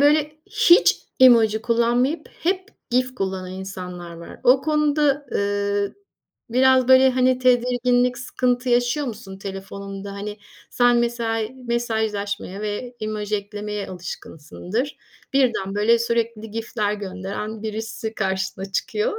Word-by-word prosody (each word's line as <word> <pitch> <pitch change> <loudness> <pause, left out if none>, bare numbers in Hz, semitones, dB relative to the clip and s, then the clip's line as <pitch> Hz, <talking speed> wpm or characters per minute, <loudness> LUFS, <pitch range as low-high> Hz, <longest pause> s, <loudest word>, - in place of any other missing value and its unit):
böyle 300 +1 +4
hiç 345 - +5 0.2
emoji 225 -4 +6
kullanmayıp 240 +6 +1
hep 375 +3 0 0.2
GIF 255 +1 +1
kullanan 190 -4 -3
insanlar 180 -2 -7
var. 170 - -11
O 255 +2 +6
konuda, 295 -2 +2
eee, 200 0 0 0.6
biraz 260 0 +4
böyle 260 0 +7
hani 255 0 +2
tedirginlik 250 0 +2
sıkıntı 250 0 -1
yaşıyor 245 +4 +2
musun? 210 -5 -7
Telefonunda 195 0 -7
hani, 205 +1 -6 0.3
sen 245 -1 +4
mesela 230 -2 0 0.2
mesajlaşmaya 215 -4 -2
ve 215 +4 -4
emoji 215 -1 -2
eklemeye 205 0 -5
alışkınsındır. 180 - -5 0.4
Birden 235 -8 +1
böyle 215 +3 +4
sürekli 230 -2 -1
GIF'ler 220 -1 -2
gönderen 200 +2 -5
birisi 220 0 -4
karşına 190 0 -2
çıkıyor. 215 - -1
225 Hz, 115 wpm, -22 LUFS, 200-250 Hz, 0.6 s, böyle